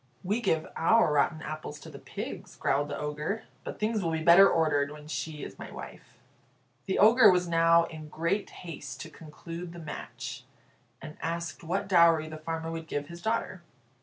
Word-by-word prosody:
"We 205 +6 0
give 160 -8 +1
our 170 -1 +4
rotten 155 +2 +1
apples 155 -1 -6
to - - -10
the - - -10
pigs," - - -7
growled 145 +2 0
the 145 - -4
Ogre. 150 +8 -3 0.2
"But - - -7
things 215 0 0
will 165 - 0
be 160 -1 -2
better 175 +4 +8
ordered 145 -3 +2
when 150 0 -11
she 155 -1 -4
is - - -9
my - - -7
wife." - - -11 0.7
The 190 - 0
Ogre 220 +1 +7
was 180 -1 +3
now 165 0 +5
in 155 -2 -8
great 170 +7 -1
haste 145 -6 -8
to 160 - -8
conclude 165 +3 -9
the - - -10
match, 155 -3 -7 0.6
and 155 0 -9
asked 170 +1 -4
what 190 +4 -2
dowry 170 -4 +5
the 155 0 -7
farmer 165 +1 -4
would 165 -1 -6
give 145 -2 -4
his 170 0 -9
daughter. 220 -4 -2
165 Hz, 185 wpm, -29 LUFS, 155-180 Hz, 0.7 s, better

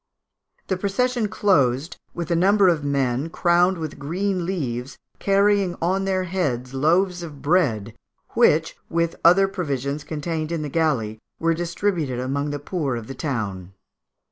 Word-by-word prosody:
The 190 - -1
procession 225 +4 0
closed 160 -8 +1 0.2
with 170 0 -4
a - - +3
number 195 +3 +4
of 160 -4 +1
men, 140 0 0
crowned 175 +2 +3
with 155 -3 -6
green 180 +4 -1
leaves, 130 -9 -3 0.2
carrying 200 -2 +2
on 190 +3 0
their 190 -1 0
heads 140 -9 -2
loaves 175 +6 +2
of 150 -5 -9
bread, 130 - +1 0.4
which, - - +3
with 170 0 0
other 185 +4 +6
provisions 145 -6 -3
contained 155 +1 -3
in 165 -2 -2
the 150 - -4
galley, 130 -9 0 0.2
were 165 0 +2
distributed 170 -5 -1
amongst 140 +3 -2
the - - -2
poor 145 -3 -2
of 115 -2 -5
the 135 - -7
town. 100 - -4
165 Hz, 145 wpm, -23 LUFS, 135-185 Hz, 0.4 s, other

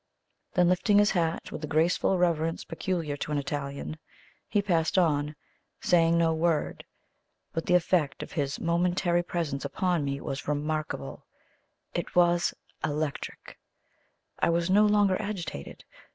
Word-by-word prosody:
Then 180 -1 +5
lifting 185 +3 +3
his 205 0 +5
hat 165 -3 -1
with - - -6
the 155 - -4
graceful 165 +5 +2
reverence 165 -2 +1
peculiar 165 -4 -3
to 150 - -4
an 150 - +1
Italian, 140 +2 -4 0.5
he 205 - +2
passed 175 -4 +1
on, 150 -4 +2 0.4
saying 170 -1 +3
no 165 -1 +3
word. 160 -1 0 0.7
But 165 - -3
the 180 - +4
effect 170 -4 +1
of - - -10
his 140 -5 -2
momentary 175 +1 +1
presence 165 -6 -3
upon 170 +3 0
me 140 0 -2
was 135 -1 -5
remarkable 150 - -3 0.7
it - - -4
was 175 -1 +4 0.3
ELECTRIC. 150 -1 -4 0.8
I - - +3
was 170 +2 +1
no 210 +2 +6
longer 205 -2 +3
agitated. 195 - -6
165 Hz, 135 wpm, -28 LUFS, 150-180 Hz, 0.8 s, no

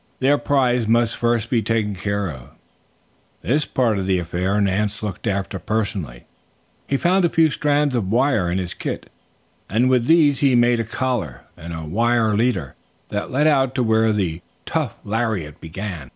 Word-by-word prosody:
Their 140 +2 +3
prize 125 -5 +1
must 115 0 +2
first 120 0 0
be 120 -3 +2
taken 110 -1 0
care 100 +1 -2
of. 65 -3 -11 0.9
This 145 +6 +1
part 115 -6 0
of 95 - -3
the 95 -1 +2
affair 90 +4 -1
Nance 100 +1 0
looked 105 +1 -4
after 100 -1 -2
personally. 90 - -3 0.6
He 140 - +1
found 185 +5 +2
a 170 - +3
few 160 -2 +3
strands 145 -1 +1
of 110 -7 -1
wire 115 -5 +2
in 90 - -1
his 90 -2 -3
kit - - -6 0.6
and 120 +5 +2
with 125 -2 +2
these 155 -4 +4
he 135 -3 +3
made 120 0 +3
a - - +1
collar 115 - -3
and 85 +2 -9
a 80 -1 -5
wire 115 +5 +1
leader 100 - 0 0.4
that 105 0 -3
led 140 +4 +1
out 135 -4 +3
to 125 - +1
where 110 -1 +3
the 90 -6 -1 0.2
tough - - -2
lariat 105 -9 -2
began. 90 +1 -6
110 Hz, 175 wpm, -21 LUFS, 95-125 Hz, 0.9 s, these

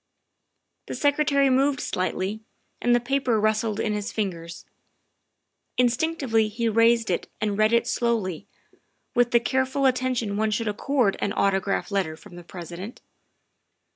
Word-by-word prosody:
The - - -5
Secretary 285 -2 +2
moved 270 +1 +2
slightly, 190 +3 -2 0.4
and 240 0 +3
the - - +3
paper 250 -2 0
rustled 215 0 0
in 215 - 0
his 210 0 -3
fingers. 170 -5 -4 1.1
Instinctively 250 -2 +1
he 230 +2 -2
raised 230 +1 +3
it - - -2
and 210 -1 -1
read 215 +1 +3
it 235 0 +3
slowly, 220 -8 -1 0.7
with 245 0 +3
the 240 - +4
careful 265 +3 0
attention 255 -5 0
one 220 +1 +1
should 215 +2 -1
accord 215 0 +1
an 200 - -1
autograph 195 +1 0
letter 180 -6 -1
from 175 - -14
the 175 - -10
President. 175 +5 -8
225 Hz, 140 wpm, -25 LUFS, 200-250 Hz, 1.1 s, the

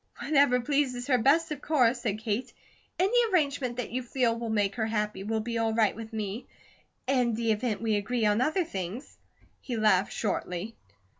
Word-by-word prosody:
"Whatever 280 -4 +3
pleases 255 -2 0
her 255 -2 +2
best, 310 +7 +3
of 290 -2 -4
course," 250 -5 +2
said 215 -4 -1
Kate. 220 +2 -3 0.5
"Any 390 +6 +1 0.2
arrangement 280 -8 0
that 245 - -4
you 255 +2 -2
feel 245 -1 0
will 230 0 -4
make 205 -2 +1
her 220 -1 0
happy, 210 -3 -2
will 220 +1 -1
be 230 +1 -3
all 225 -1 0
right 220 -2 +3
with 225 +1 -8
me; 215 +1 -4 0.6
in 250 -3 +1
the 230 0 0
event 220 0 -1
we 220 -2 +1
agree 220 +3 -1
on 210 +2 +3
other 315 +7 +1
things." 195 - -6 0.4
He 245 -3 -4
laughed, 205 -3 +3
shortly. 205 0 -3
230 Hz, 180 wpm, -28 LUFS, 215-255 Hz, 0.6 s, Whatever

